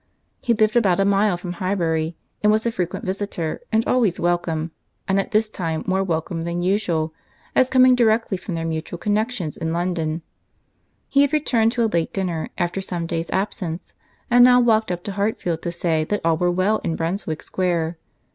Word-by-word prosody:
He 235 - +2
lived 215 +1 +2
about 200 -6 +3
a 195 - +3
mile 200 -1 +3
from 175 0 -6
Highbury, 170 -3 -1 0.3
was 215 +2 +3
a 235 - +1
frequent 180 -5 -3
visitor, 185 -4 -3
and 220 +1 +2
always 225 -8 +2
welcome, 170 -2 0 0.4
and 195 0 +2
at 195 - -2
this 215 -1 +2
time 165 -6 -3
more 190 +1 +1
welcome 165 -1 -2
than 170 +1 -2
usual, 175 -5 0 0.4
as 255 - +4
coming 255 -1 +6
directly 225 -3 +2
from 180 -1 -5
their 165 0 -3
mutual 160 +1 -4
connexions 210 -3 -1
in 160 - -2
London. 170 -2 -1 0.8
He 280 - +3
had 285 -1 +3
returned 235 -7 +2
to 240 -1 +1
a - - +4
late 170 -7 0
dinner, 180 -5 -2
after 175 +2 -1
some 175 -3 -3
days' 165 0 -3
absence, 185 -3 -3 0.3
and 245 0 +6
now 250 0 +7
walked 225 -4 +3
up 175 0 -4
to 205 - -4
Hartfield 195 -5 -1
to 170 - -3
say 165 -2 0
that 205 +5 -1
all 165 -1 +4
were 175 +2 +1
well 185 +5 +1
in 165 - -1
Brunswick 165 -1 -2
Square. 170 -3 -1
185 Hz, 185 wpm, -22 LUFS, 165-215 Hz, 0.8 s, now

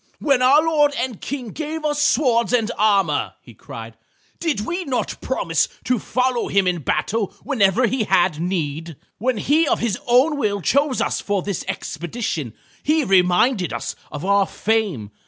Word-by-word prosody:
"When 275 -4 +2
our 275 +5 +5
lord 295 -3 +2
and 250 -6 -3
King 265 -5 -5
gave 310 +5 -5
us 295 -1 0
swords 240 -4 +2
and 235 -2 +2
armor," 195 -8 +1
he 120 - -16
cried, 115 +1 -10 0.4
"did 315 -11 -1
we 345 - -3
not 265 -6 -3
promise - - 0 0.2
to 250 -2 0
follow 255 +1 0
him 195 0 +2
in 180 -1 0
battle 195 - -1
whenever 230 -3 +2
he 235 -2 0
had 175 -5 +2
need? 165 -2 -3 0.2
When 250 +2 0
he 300 +9 +2
of - - +2
his 230 -4 -2
own 260 +6 +4
will 205 -5 0
chose 275 - +1
us - - -1
for 200 -3 -1
this 200 -4 -3
expedition 160 - -4 0.3
he 310 +1 +2
reminded 185 +1 +3
us - - -4 0.2
of 150 +3 -6
our 200 0 +3
fame. 200 - -1
225 Hz, 165 wpm, -21 LUFS, 180-265 Hz, 0.4 s, our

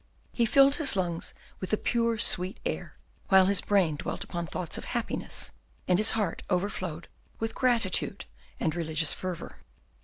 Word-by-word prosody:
He 235 -2 +2
filled 275 +3 +5
his 290 -9 +3
lungs 175 -3 -1 0.3
with 185 - -5
the 215 - +2
pure, 230 0 +1
sweet 185 -2 +1
air, - - -4 0.3
while 190 -1 +6
his 200 0 +3
brain 185 -7 +2
dwelt - - -3
upon 170 -1 -4
thoughts 170 +1 -3
of - - -8
happiness, - - -2 0.4
and 180 0 +3
his 215 - +5
heart 205 -6 -1
overflowed 180 -3 -2 0.3
with 225 0 -3
gratitude 230 -6 +1 0.3
and 160 - 0
religious 160 -2 +1
fervour. 185 -3 -6
190 Hz, 155 wpm, -29 LUFS, 170-225 Hz, 0.4 s, while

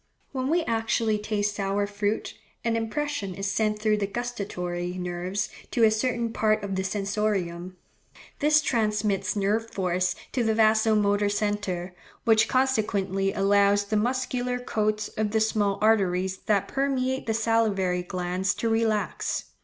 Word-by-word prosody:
When 260 -1 -2
we 335 +2 +2
actually 225 -3 0
taste 210 -1 -1
sour 200 0 0
fruit, 205 +1 -2 0.3
an 230 -1 +1
impression 230 -3 -2
is 195 +1 -2
sent 215 0 +1
through 215 0 +1
the 200 -1 -1
gustatory 185 -6 -4
nerves 180 +3 -3 0.2
to 235 - +1
a 220 - +6
certain 235 0 -1
part 215 -1 +1
of 200 -1 -3
the 190 0 -1
sensorium; 190 -3 -2 0.6
this 300 +1 +4
transmits 210 -5 0
nerve 210 +3 0
force 185 -2 0 0.2
to 250 - 0
the 220 -1 +1
vasomotor 215 -2 +3
centre, 205 -4 -2 0.3
which 220 -2 +4
consequently 205 -7 +1
allows 200 +1 +3
the 205 +2 -3
muscular 250 +2 0
coats 215 -3 -1
of 215 -1 -2
the 220 +1 +1
small 210 -2 +1
arteries 190 -4 +2
that 205 -3 +2
permeate 265 -2 -1
the 220 - +1
salivary 215 -5 +1
glands 180 +1 -2
to 230 - -1
relax. 225 -2 -1
210 Hz, 140 wpm, -26 LUFS, 195-225 Hz, 0.6 s, a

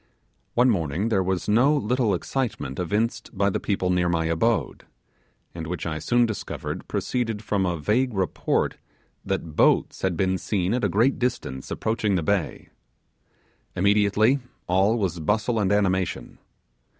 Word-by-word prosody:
One 125 +1 +5
morning 85 +2 -1
there 100 -4 +2
was 95 -1 -1
no 125 +8 +4
little 120 -4 +1
excitement 115 - -3
evinced 110 +5 -2
by 100 +1 +2
the - - -1
people 95 -3 -1
near 90 -1 +2
my 80 -1 0
abode, 100 +8 0 0.7
and 80 -2 -6
which 85 -1 -4
I 80 -2 -3
soon 120 +9 +2
discovered 110 -3 -5
proceeded 115 -4 -2
from 100 -3 0
a 85 -1 -1
vague 110 - 0
report 95 -3 0 0.5
that 85 -5 -3
boats, - - +3
had 95 -3 0
been 95 -1 +1
seen 95 -1 -1
at 125 -1 -1
a 100 - +2
great 115 +9 +2
distance 120 - -3
approaching 110 -3 0
the 85 - 0
bay. 95 -1 -1 1.1
Immediately 105 +6 +3 0.3
all 95 +5 +2
was 90 -6 -1
bustle 110 +7 0
and 100 -2 +1
animation. 95 -3 0
100 Hz, 150 wpm, -24 LUFS, 90-115 Hz, 1.1 s, One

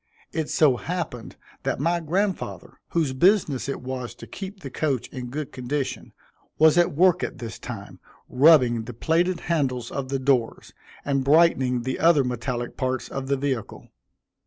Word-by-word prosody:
It 160 -2 -2
so 140 -6 +4
happened 160 -10 -5 0.3
that - - -2
my 170 +4 +1
grandfather, 185 +5 -3
whose 155 -6 0
business 155 - +2
it 140 - -4
was 125 -1 -5
to - - -11
keep 195 0 -8
the - - -7
coach 140 -6 -1
in 125 -2 -7
good 145 +2 -5
condition, 135 +2 -4 0.5
was 155 0 +6
at 175 -4 +3
work 180 +2 +4
at - - -4
this 115 -2 -7
time, 115 -5 -8 0.3
rubbing 125 -5 +5
the 120 - -8
plated 170 +6 +1
handles 130 -8 -1
of 135 -2 -4
the 135 - 0
doors, 130 -3 0 0.3
and 135 -1 +1
brightening 135 -5 +3
the 130 +1 -3
other 160 -4 +5
metallic 120 -1 -3
parts 130 -1 -2
of 135 -1 -5
the 140 0 +1
vehicle. 130 -5 -4
140 Hz, 160 wpm, -24 LUFS, 125-165 Hz, 0.5 s, was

